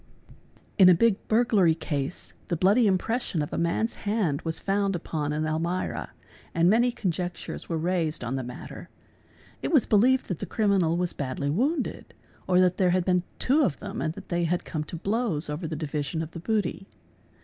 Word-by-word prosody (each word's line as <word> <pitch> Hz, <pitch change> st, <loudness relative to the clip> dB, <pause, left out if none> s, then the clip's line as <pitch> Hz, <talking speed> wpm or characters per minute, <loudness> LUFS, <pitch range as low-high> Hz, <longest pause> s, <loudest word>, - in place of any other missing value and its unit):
— -, -, -32 dB
In 185 Hz, -2 st, +9 dB
a 180 Hz, -, +7 dB
big 225 Hz, +3 st, +4 dB
burglary 215 Hz, -7 st, +3 dB
case 145 Hz, -1 st, -3 dB
the 170 Hz, -, -1 dB
bloody 205 Hz, +7 st, +4 dB
impression 195 Hz, -3 st, 0 dB
of 145 Hz, -, -7 dB
a -, -, -1 dB
man's 170 Hz, +7 st, 0 dB
hand 200 Hz, -9 st, 0 dB
was 160 Hz, -1 st, -3 dB
found 195 Hz, -1 st, 0 dB
upon 155 Hz, -3 st, -3 dB
an 155 Hz, +1 st, -1 dB
almirah 165 Hz, +4 st, -2 dB, 0.5 s
and 170 Hz, 0 st, +4 dB
many 235 Hz, +5 st, +4 dB
conjectures 180 Hz, -5 st, -4 dB
were 165 Hz, -, -1 dB
raised 165 Hz, -3 st, -1 dB
on 120 Hz, +2 st, -3 dB
the 135 Hz, -, -1 dB
matter. 125 Hz, 0 st, -9 dB, 0.7 s
It -, -, -2 dB
was 290 Hz, -9 st, +5 dB
believed 250 Hz, +5 st, +3 dB
that 180 Hz, -, -3 dB
the -, -, -5 dB
criminal 195 Hz, -6 st, +2 dB
was 180 Hz, -1 st, -1 dB
badly 140 Hz, +1 st, -2 dB
wounded, 270 Hz, -, -1 dB, 0.3 s
or 180 Hz, -1 st, +4 dB
that 180 Hz, -1 st, +3 dB
there 185 Hz, -2 st, +3 dB
had 180 Hz, 0 st, +1 dB
been 180 Hz, -1 st, +3 dB, 0.2 s
two 280 Hz, +5 st, +3 dB
of 210 Hz, -, +1 dB
them 205 Hz, +3 st, -6 dB
and 160 Hz, 0 st, -2 dB
that -, -, -11 dB
they 175 Hz, -1 st, 0 dB
had 175 Hz, +2 st, -1 dB
come 155 Hz, -2 st, -3 dB
to 170 Hz, -, -7 dB
blows 195 Hz, -4 st, -1 dB
over 160 Hz, +3 st, -4 dB
the 160 Hz, -, -4 dB
division 150 Hz, +1 st, -3 dB
of 160 Hz, -, -8 dB
the 170 Hz, -, -7 dB
booty. 200 Hz, +1 st, -2 dB
180 Hz, 195 wpm, -26 LUFS, 160-205 Hz, 0.7 s, In